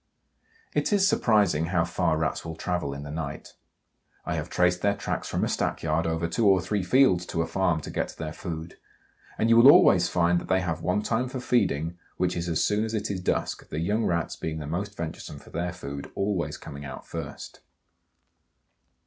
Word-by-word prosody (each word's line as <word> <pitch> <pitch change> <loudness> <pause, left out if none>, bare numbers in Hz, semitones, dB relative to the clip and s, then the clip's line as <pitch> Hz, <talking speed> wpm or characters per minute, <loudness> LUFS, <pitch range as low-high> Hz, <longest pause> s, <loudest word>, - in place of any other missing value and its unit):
It - - 0
is 200 -1 +4
surprising 100 - +3
how 85 -1 +1
far 85 -2 0
Rats 80 0 -1
will 80 0 -6
travel 90 -3 -2
in 70 - -7
the 70 - -7
night. 75 -2 -6 0.7
I - - -2
have - - -3
traced 90 0 +2
their 100 0 +2
tracks 100 - -3
from - - -1
a - - +2
stackyard 80 +1 -1
over 80 +1 -1
two 105 +6 +1
or 95 -1 +6
three 95 +3 -1
fields 90 -2 +4
to 85 - -1
a - - -2
farm 90 -4 0
to - - -7
get - - -1
to - - -12
their 80 -1 -5
food. 80 -2 -7 0.6
And 110 - +2
you 115 0 +5
will 125 +4 +10
always 90 - +6
find 85 0 +2
that - - -9
they 95 0 +2
have 85 -2 -2
one 90 +5 0
time 120 +3 0
for 130 - -5
feeding, 90 - 0 0.2
which 90 0 0
is 85 0 -2
as 80 - +1
soon 105 +1 +1
as 110 0 -2
it 105 - -2
is 95 -2 -3
dusk, - - -2
the 75 - -5
young 105 +7 0
Rats 85 -1 -1
being 80 -1 -4
the 75 - -5
most 95 +7 -4
venturesome 80 -3 -6
for - - -15
their 90 +1 -2
food, 70 -5 -7
always 100 -3 -1
coming 70 +1 -9
out 65 -1 -8
first. 80 -4 -7
90 Hz, 210 wpm, -27 LUFS, 80-100 Hz, 0.7 s, will